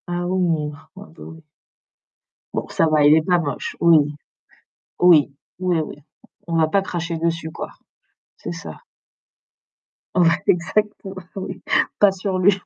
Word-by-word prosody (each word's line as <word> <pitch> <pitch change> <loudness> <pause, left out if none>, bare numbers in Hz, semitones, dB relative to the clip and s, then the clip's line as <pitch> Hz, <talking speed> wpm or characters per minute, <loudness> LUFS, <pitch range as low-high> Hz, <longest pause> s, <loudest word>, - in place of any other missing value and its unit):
Ah 175 0 -2
ouh, 165 -5 0
ah 155 - -19
bah 195 +2 -11
oui. 160 0 -11 1.1
Bon - - -3
ça - - +1
va, 155 -2 +3
il 150 +1 +7
est 160 - +4
pas 175 +2 +2
moche, 145 -5 -4
oui, 155 -3 +4 0.9
oui, 165 -5 +6 0.3
oui. 170 -6 -1 0.5
On 165 - -1
va 160 -1 +4
pas 195 +4 +2
cracher 170 -3 -4
dessus 165 0 -2
quoi, - - -6 0.7
c'est - - -6
ça. - - -8 1.4
On 180 - +4
va 165 0 +5
exactement, 195 +3 0 0.2
oui, 195 - -6 0.4
pas 205 -1 +6
sur 190 0 -3
lui. 185 +2 +5
170 Hz, 140 wpm, -21 LUFS, 160-185 Hz, 1.4 s, il